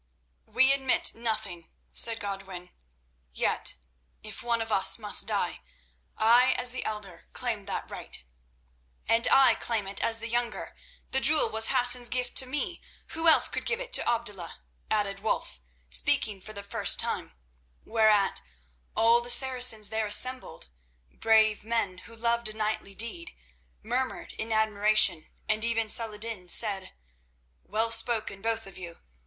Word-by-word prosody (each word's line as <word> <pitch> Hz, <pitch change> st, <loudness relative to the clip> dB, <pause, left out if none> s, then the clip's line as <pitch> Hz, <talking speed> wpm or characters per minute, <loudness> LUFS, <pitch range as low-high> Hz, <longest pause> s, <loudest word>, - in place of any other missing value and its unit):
"We 265 Hz, +1 st, +3 dB
admit 270 Hz, -1 st, +1 dB
nothing," 215 Hz, -7 st, -6 dB, 0.2 s
said 230 Hz, -1 st, +6 dB
Godwin; 195 Hz, -3 st, -9 dB, 0.6 s
"yet, -, -, -1 dB, 0.5 s
if -, -, -5 dB
one 235 Hz, -1 st, -2 dB
of 225 Hz, 0 st, -6 dB
us 195 Hz, -2 st, +7 dB
must 210 Hz, -2 st, +2 dB
die, -, -, -3 dB, 0.6 s
I 240 Hz, +3 st, +3 dB
as 250 Hz, 0 st, -1 dB
the 255 Hz, -, -5 dB
elder 210 Hz, -4 st, -8 dB
claim -, -, -3 dB
that -, -, -6 dB
right." -, -, -8 dB, 0.8 s
"And 230 Hz, +1 st, +2 dB
I 270 Hz, -1 st, +5 dB
claim 225 Hz, -4 st, -3 dB
it 195 Hz, +1 st, 0 dB
as 225 Hz, -, +2 dB
the 230 Hz, 0 st, -7 dB
younger. 240 Hz, 0 st, -4 dB, 0.4 s
The 265 Hz, -, +1 dB
jewel 305 Hz, +3 st, +5 dB
was 220 Hz, 0 st, +3 dB
Hassan's 245 Hz, -2 st, +1 dB
gift 250 Hz, 0 st, -3 dB
to 260 Hz, -, +5 dB
me; 295 Hz, +6 st, -5 dB, 0.3 s
who 325 Hz, +1 st, -1 dB
else 320 Hz, -, +7 dB
could -, -, -4 dB
give 460 Hz, -, -2 dB
it -, -, -8 dB
to -, -, +3 dB
Abdullah?" 210 Hz, -8 st, -5 dB, 0.3 s
added 200 Hz, -2 st, -2 dB
Wulf, 200 Hz, -, -4 dB, 0.3 s
speaking 190 Hz, -, +1 dB
for 215 Hz, -, -11 dB
the 200 Hz, -1 st, -9 dB
first 200 Hz, -, +2 dB
time, -, -, -2 dB, 0.5 s
whereat 215 Hz, -3 st, +1 dB, 0.6 s
all 230 Hz, +1 st, +3 dB
the 240 Hz, -, -8 dB
Saracens 245 Hz, -5 st, +4 dB
there 220 Hz, 0 st, -3 dB
assembled, 255 Hz, +5 st, 0 dB, 0.4 s
brave 220 Hz, -2 st, +1 dB
men 220 Hz, -5 st, -3 dB
who 230 Hz, +4 st, -11 dB
loved 235 Hz, 0 st, -1 dB
a -, -, -9 dB
knightly 215 Hz, -2 st, -4 dB
deed, 330 Hz, -, -2 dB, 0.5 s
murmured 250 Hz, +4 st, -4 dB
in 225 Hz, +1 st, -5 dB
admiration, 215 Hz, -5 st, +2 dB, 0.2 s
and 215 Hz, 0 st, 0 dB
even 230 Hz, -1 st, -1 dB
Saladin 215 Hz, -4 st, -1 dB
said: 195 Hz, +1 st, +2 dB, 0.7 s
"Well 225 Hz, +2 st, -3 dB
spoken, 225 Hz, -3 st, +1 dB
both 225 Hz, 0 st, -3 dB
of 195 Hz, -1 st, -11 dB
you. 170 Hz, -2 st, -11 dB
225 Hz, 150 wpm, -26 LUFS, 205-240 Hz, 0.8 s, us